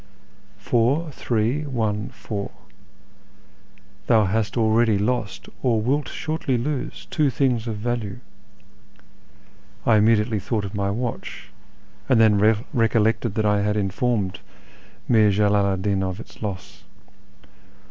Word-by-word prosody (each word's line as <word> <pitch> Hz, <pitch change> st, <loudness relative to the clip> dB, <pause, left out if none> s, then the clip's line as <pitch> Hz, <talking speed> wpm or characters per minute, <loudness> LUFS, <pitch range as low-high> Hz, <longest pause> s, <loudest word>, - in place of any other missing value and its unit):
Four, 135 Hz, +8 st, +1 dB
three, 120 Hz, +2 st, -1 dB
one, 110 Hz, -7 st, -2 dB
four; 100 Hz, -2 st, -5 dB, 1.6 s
thou 110 Hz, -2 st, +4 dB
hast 105 Hz, +2 st, -1 dB
already 110 Hz, -1 st, +3 dB
lost, 110 Hz, +1 st, -2 dB
or 120 Hz, -4 st, +2 dB
wilt 135 Hz, +6 st, 0 dB
sliortly 155 Hz, -5 st, -2 dB
lose, 130 Hz, +1 st, -4 dB
two 150 Hz, -4 st, +2 dB
things 125 Hz, -4 st, 0 dB
of 110 Hz, -2 st, -3 dB
value 115 Hz, -2 st, -3 dB, 0.9 s
" 100 Hz, +1 st, -30 dB
(I 110 Hz, -2 st, +5 dB
immediately 105 Hz, 0 st, +3 dB
thought 105 Hz, +1 st, -2 dB
of 100 Hz, -, -7 dB
my 100 Hz, -1 st, -1 dB
watch, 115 Hz, +3 st, -5 dB, 0.6 s
and 125 Hz, -, +4 dB
then 110 Hz, -2 st, +5 dB, 0.3 s
recollected 115 Hz, -2 st, +1 dB
that 110 Hz, -, 0 dB
I 105 Hz, -1 st, +2 dB
had 105 Hz, +1 st, 0 dB
informed 100 Hz, 0 st, -1 dB, 0.7 s
Mir 110 Hz, -3 st, +5 dB
Jalalu 100 Hz, -1 st, +2 dB
'd -, -, -6 dB
Din 100 Hz, -2 st, +1 dB
of 95 Hz, +1 st, -3 dB
its -, -, -13 dB
loss). 100 Hz, -4 st, -6 dB
110 Hz, 125 wpm, -23 LUFS, 105-120 Hz, 1.6 s, I